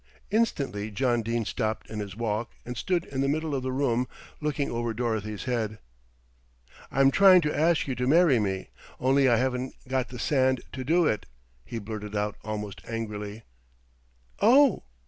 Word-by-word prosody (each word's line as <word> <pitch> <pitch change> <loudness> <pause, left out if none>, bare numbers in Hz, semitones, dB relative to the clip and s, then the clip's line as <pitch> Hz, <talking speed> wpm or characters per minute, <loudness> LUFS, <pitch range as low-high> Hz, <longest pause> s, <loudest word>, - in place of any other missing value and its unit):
Instantly 140 - 0
John 120 +2 +1
Dene 115 0 -1
stopped 110 0 -2
in 110 - -6
his 100 -2 -5
walk, 115 0 -1 0.2
and 125 - -5
stood 170 +8 0
in 135 -1 -3
the 135 - +1
middle 155 +1 -1
of 135 - -1
the 130 0 -2
room 130 -2 +1 0.3
looking 150 -2 -1
over 115 -1 -2
Dorothy's 110 -3 -2
head. 110 -4 -2 1.1
"I'm 135 0 +4
trying 190 +2 +7
to 150 -2 -1
ask 160 +1 +2
you 135 - -1
to 125 0 -2
marry 155 -3 +5
me, 95 -2 -2 0.3
only 135 +1 +4
I 120 - +5
haven't 130 +1 -1
got 130 -1 -1
the 125 - -8
sand 130 -1 +2
to 130 - -4
do 165 +5 +3
it," 105 -9 0 0.4
he 115 - -6
blurted 105 -1 -6
out 105 0 -1
almost 105 -2 -5
angrily. 105 -1 -5 1.0
"Oh!" 260 - +5
125 Hz, 165 wpm, -27 LUFS, 110-140 Hz, 1.1 s, trying